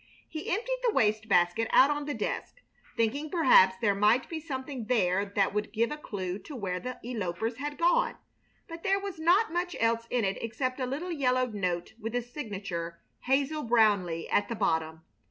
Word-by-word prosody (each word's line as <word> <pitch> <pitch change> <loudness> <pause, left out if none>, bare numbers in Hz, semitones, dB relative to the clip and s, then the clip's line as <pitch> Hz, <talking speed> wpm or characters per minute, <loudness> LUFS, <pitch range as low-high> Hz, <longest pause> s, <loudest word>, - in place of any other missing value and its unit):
He 310 0 -6
emptied 485 +6 -1
the 480 -3 +1
waste 215 0 +2
basket 175 +6 +3
out 275 +3 +6
on 295 0 -2
the 290 - -3
desk, - - -3 0.4
thinking 280 +7 0
perhaps 255 - +5
there 205 -3 +2
might 210 +5 +3
be 325 - -4
something 265 -5 -5
there 200 -5 +2
that 200 -1 +2
would 210 0 -2
give 230 +3 0
a 300 - -4
clue 190 -9 -5
to 295 - -10
where 185 -6 -3
the 255 +5 -6
elopers 225 -1 -3
had 290 +2 -5
gone; 350 +9 +2 0.5
but 330 -1 -8
there 390 +1 +2
was 390 -4 -6
not 345 +4 +3
much 355 0 -1
else 230 0 +1
in 245 -4 +1
it 195 0 -1
except 255 +4 -3
a 255 - -1
little 310 +8 -4
yellowed 255 -5 +1
note 180 -1 -2
with 225 +1 -5
the 245 - 0
signature 195 - -6 0.3
"Hazel 285 +3 +1
Brownleigh" 205 -8 +2
at 205 - +2
the 230 - -2
bottom. 160 -4 -1
235 Hz, 190 wpm, -29 LUFS, 200-295 Hz, 0.5 s, out